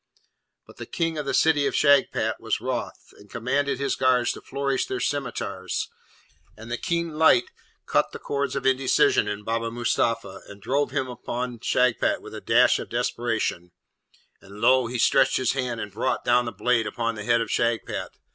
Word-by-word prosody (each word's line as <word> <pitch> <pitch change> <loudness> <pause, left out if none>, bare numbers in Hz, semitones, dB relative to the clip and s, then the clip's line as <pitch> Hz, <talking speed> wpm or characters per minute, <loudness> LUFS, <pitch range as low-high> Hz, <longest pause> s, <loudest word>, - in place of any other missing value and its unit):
But - - -17
the - - -8
King 165 -2 -2
of 145 - -5
the - - -1
City 150 -3 +3
of - - -2
Shagpat 140 -2 +3
was - - -1
wroth, - - -5
and 105 - -17
commanded 135 +4 -1
his 140 +1 -1
guards 125 -2 +2
to - - -8
flourish 140 -1 -2
their 130 - -3
scimitars, 105 -10 -3 0.7
and 115 +2 -10
the 120 - -1
keen 170 -3 -2
light 160 -6 +4 0.3
cut - - +1
the - - -7
chords 140 0 -3
of 140 - -3
indecision 130 -1 +3
in 105 0 -4
Baba 115 +1 -2
Mustapha, 115 -4 -1
and 100 0 -12
drove 140 +5 0
him 135 -1 -2
upon 125 -1 -5
Shagpat 125 +1 +1
with - - -12
a - - -7
dash - - +4
of - - -7
desperation; 115 -7 -2 0.7
and 100 +1 -13
lo! 130 +1 +4
he 125 +1 -4
stretched - - +3
his 130 -2 +1
hand 125 -4 -2
and 105 -1 -5
brought 110 +6 -2
down 120 0 +3
the 115 - -4
blade 115 -3 +1
upon 115 +2 -2
the 105 -2 -7
head 115 +2 +3
of 115 - -3
Shagpat. 115 -1 -1
125 Hz, 185 wpm, -25 LUFS, 115-135 Hz, 0.7 s, light